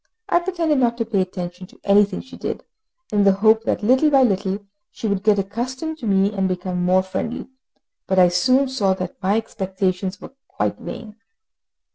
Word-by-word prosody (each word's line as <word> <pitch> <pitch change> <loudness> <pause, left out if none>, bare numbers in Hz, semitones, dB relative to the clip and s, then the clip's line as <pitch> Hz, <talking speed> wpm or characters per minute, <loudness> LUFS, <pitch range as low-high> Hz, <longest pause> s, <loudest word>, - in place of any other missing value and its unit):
I 345 - +4
pretended 340 -5 0
not 235 -2 +2
to 230 - -1
pay 210 -4 +1
attention 180 -1 -5
to - - -21
anything 200 -1 +3
she 260 - -13
did, - - -5 0.5
in 205 -1 +3
the 195 -1 +5
hope 220 +3 +3
that - - -1
little 260 +7 +4
by 275 -2 +5
little 200 -2 0 0.2
she 225 - -5
would 200 -2 0
get 210 0 +3
accustomed 255 +11 -3
to 235 - -5
me, 195 +1 +2
and 195 -2 0
become 180 -1 -2
more 185 +1 +3
friendly; 190 +5 -4 0.6
but 190 - 0
I 180 -1 +7
soon 255 +10 +3
saw 205 -8 +1
that 185 -1 -6
my 195 +3 +2
expectations 190 -3 -2
were - - -11
quite - - -2
vain. 220 -2 -8
200 Hz, 185 wpm, -21 LUFS, 190-240 Hz, 0.6 s, I